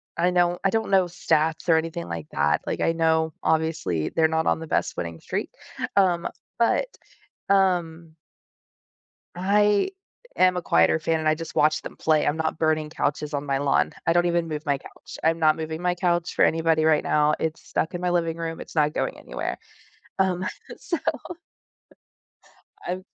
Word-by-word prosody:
I 175 Hz, -, +2 dB
know 175 Hz, -1 st, +2 dB
I 195 Hz, -, +3 dB
don't 220 Hz, +1 st, -1 dB
know 190 Hz, -1 st, +5 dB
stats 160 Hz, -1 st, 0 dB
or 165 Hz, -, +6 dB
anything 165 Hz, +1 st, -3 dB
like 80 Hz, -2 st, -6 dB
that. 75 Hz, 0 st, +1 dB
Like, -, -, -2 dB
I -, -, +3 dB
know, 160 Hz, -1 st, +1 dB
obviously, 155 Hz, -, 0 dB
they're 160 Hz, -1 st, +2 dB
not 160 Hz, 0 st, 0 dB
on -, -, +2 dB
the 160 Hz, -, -7 dB
best -, -, -1 dB
winning 85 Hz, -1 st, -5 dB
streak, -, -, -4 dB, 0.5 s
um, 180 Hz, -3 st, +3 dB, 0.3 s
but, 235 Hz, -, +3 dB, 0.6 s
um 170 Hz, -4 st, +1 dB, 1.2 s
I 205 Hz, -, +2 dB, 0.5 s
am 185 Hz, 0 st, +4 dB
a 180 Hz, -, -2 dB
quieter 85 Hz, -, +3 dB
fan, 160 Hz, 0 st, 0 dB
and 155 Hz, 0 st, 0 dB
I 155 Hz, -, +4 dB
just 165 Hz, +1 st, -8 dB
watch 155 Hz, +1 st, +2 dB
them -, -, -9 dB
play, 155 Hz, -1 st, +2 dB
I'm 145 Hz, -, +1 dB
not 160 Hz, -1 st, -2 dB
burning 155 Hz, -1 st, +1 dB
couches 150 Hz, 0 st, -2 dB
on 145 Hz, -, -2 dB
my 135 Hz, -1 st, 0 dB
lawn. 140 Hz, 0 st, +1 dB
I 165 Hz, -, +4 dB
don't 175 Hz, 0 st, +3 dB
even 170 Hz, -1 st, 0 dB
move 155 Hz, -1 st, -4 dB
my 140 Hz, -1 st, +1 dB
couch. -, -, -12 dB
I'm 165 Hz, +1 st, +3 dB
not 155 Hz, -1 st, +4 dB
moving 160 Hz, +1 st, -5 dB
my 180 Hz, 0 st, +1 dB
couch 175 Hz, -1 st, 0 dB
for -, -, +4 dB
anybody 160 Hz, -1 st, +2 dB
right 155 Hz, -1 st, +4 dB
now, 150 Hz, 0 st, +3 dB
it's 160 Hz, -1 st, -3 dB
stuck 160 Hz, -, -1 dB
in 175 Hz, -, -3 dB
my 180 Hz, 0 st, 0 dB
living 165 Hz, -2 st, 0 dB
room, 165 Hz, -1 st, -5 dB
it's -, -, -10 dB
not 150 Hz, -2 st, +2 dB
going -, -, -2 dB
anywhere. -, -, -5 dB, 0.6 s
Um, 185 Hz, -1 st, +1 dB, 0.3 s
so 345 Hz, -, -3 dB, 1.9 s
I've 185 Hz, +1 st, -3 dB
160 Hz, 180 wpm, -24 LUFS, 155-175 Hz, 1.9 s, or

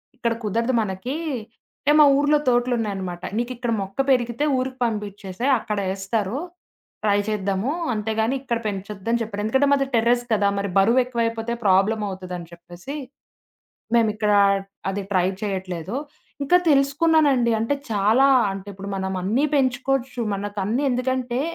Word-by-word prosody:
ఇక్కడ 235 Hz, -3 st, -1 dB
కుదరదు 230 Hz, +5 st, 0 dB
మనకి" 205 Hz, +6 st, -4 dB, 0.7 s
అంటే, 295 Hz, -, +3 dB
మా 300 Hz, -, +9 dB
ఊర్లో 290 Hz, +1 st, +3 dB
తోటలున్నాయనమాట. 215 Hz, -8 st, 0 dB
"నీకిక్కడ 240 Hz, 0 st, -2 dB
మొక్క 195 Hz, +4 st, -7 dB
పెరిగితే 240 Hz, +3 st, +1 dB
ఊరికి 255 Hz, 0 st, -3 dB
పంపించేసేయి 210 Hz, +2 st, -2 dB
అక్కడేస్తారు. 200 Hz, +3 st, -2 dB, 0.7 s
ట్రై 205 Hz, -1 st, +3 dB
చేద్దాము. 200 Hz, +4 st, -1 dB, 0.2 s
అంతేగాని 220 Hz, +3 st, -1 dB
ఇక్కడ 235 Hz, -4 st, -2 dB
పెంచొద్దని" 205 Hz, +3 st, -3 dB
చెప్పారు. 205 Hz, -2 st, -5 dB
ఎందుకంటే 265 Hz, +5 st, +2 dB
మాది 275 Hz, -1 st, +3 dB
టెర్రస్ 240 Hz, +2 st, +2 dB
కదా! 205 Hz, -1 st, +2 dB
మరి 200 Hz, -1 st, -2 dB
బరువు 230 Hz, +6 st, +5 dB
ఎక్కువైపోతే 230 Hz, -1 st, -2 dB
ప్రాబ్లమ్ 200 Hz, +3 st, +3 dB
అవుతదని 180 Hz, -2 st, -7 dB
చెప్పేసి. 175 Hz, -, -9 dB, 1.0 s
మేమిక్కడా 215 Hz, -2 st, +3 dB, 0.5 s
అది 195 Hz, +1 st, -2 dB
ట్రై 185 Hz, -1 st, +3 dB, 0.2 s
చేయట్లేదు. 190 Hz, -1 st, -4 dB, 0.5 s
ఇంకా 355 Hz, +6 st, +4 dB
తెలుసుకున్నానండి. 280 Hz, -3 st, +3 dB
అంటే 230 Hz, +6 st, +1 dB, 0.2 s
చాలా, 215 Hz, +6 st, +4 dB, 0.3 s
అంటే 195 Hz, 0 st, -8 dB
ఇప్పుడు 195 Hz, +1 st, -8 dB
మనం 190 Hz, 0 st, -2 dB
అన్నీ 230 Hz, +10 st, +1 dB
పెంచుకోవచ్చు. 260 Hz, -1 st, 0 dB
మనకన్నీ 205 Hz, +5 st, -2 dB
ఎందుకంటే, 255 Hz, 0 st, -1 dB
225 Hz, 125 wpm, -23 LUFS, 195-255 Hz, 1.0 s, మా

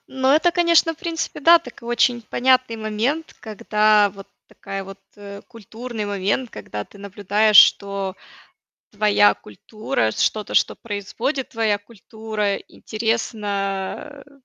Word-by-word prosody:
Ну, 265 Hz, 0 st, -1 dB
это, 320 Hz, +5 st, +4 dB
конечно, 335 Hz, -2 st, +3 dB
в -, -, -29 dB
принципе, 335 Hz, -5 st, -4 dB
да, 335 Hz, +3 st, +7 dB
такой 240 Hz, -7 st, -12 dB
очень 240 Hz, 0 st, +1 dB
понятный 255 Hz, 0 st, +1 dB
момент, 225 Hz, +9 st, -2 dB
когда 210 Hz, -1 st, +2 dB
вот 195 Hz, 0 st, -13 dB, 0.2 s
такая 195 Hz, 0 st, -7 dB
вот, 195 Hz, 0 st, -11 dB, 0.2 s
э, 200 Hz, 0 st, -10 dB
культурный 230 Hz, 0 st, -7 dB
момент, 205 Hz, +5 st, -2 dB
когда 105 Hz, -1 st, -7 dB
ты 200 Hz, -, -18 dB
наблюдаешь, 205 Hz, +1 st, +1 dB
что 200 Hz, -1 st, +4 dB, 0.8 s
твоя 205 Hz, 0 st, +3 dB
культура, 110 Hz, -, -4 dB
что-то, 215 Hz, -, -1 dB
что -, -, +2 dB
производит 230 Hz, +6 st, -4 dB
твоя 220 Hz, -3 st, 0 dB
культура, 215 Hz, -1 st, -4 dB
интересно, 215 Hz, +3 st, -4 dB
э, 285 Hz, -, -22 dB
215 Hz, 125 wpm, -21 LUFS, 200-255 Hz, 0.8 s, да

